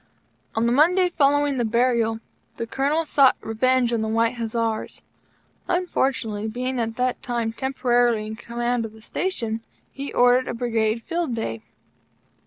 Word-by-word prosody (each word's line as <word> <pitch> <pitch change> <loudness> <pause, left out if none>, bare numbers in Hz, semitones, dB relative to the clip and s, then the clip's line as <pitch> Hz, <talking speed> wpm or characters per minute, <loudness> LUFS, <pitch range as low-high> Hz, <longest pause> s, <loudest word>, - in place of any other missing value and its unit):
On 225 +1 +1
the 235 - +2
Monday 355 +7 +4
following 290 -3 +2
the 240 - +1
burial, 230 -1 +1 0.4
the 230 - -3
Colonel 285 +7 0
sought 275 -3 +5
revenge 245 +2 +1
on 230 - +1
the 220 - -1
White 230 +2 +1
Hussars. 230 -1 -3 0.6
Unfortunately, 260 - -1
being 250 +3 -3
at 225 -1 -2
that 250 0 -1
time 235 -2 -2
temporarily 245 -3 +1
in 220 0 -6
Command 240 +1 -2
of 220 -1 -7
the 220 - -15
Station, 230 -13 -2 0.3
he 275 +1 -6
ordered 245 +1 +4
a - - -3
Brigade 230 -1 0
field 335 -5 -2
day. 115 - -4
240 Hz, 150 wpm, -23 LUFS, 225-265 Hz, 0.6 s, sought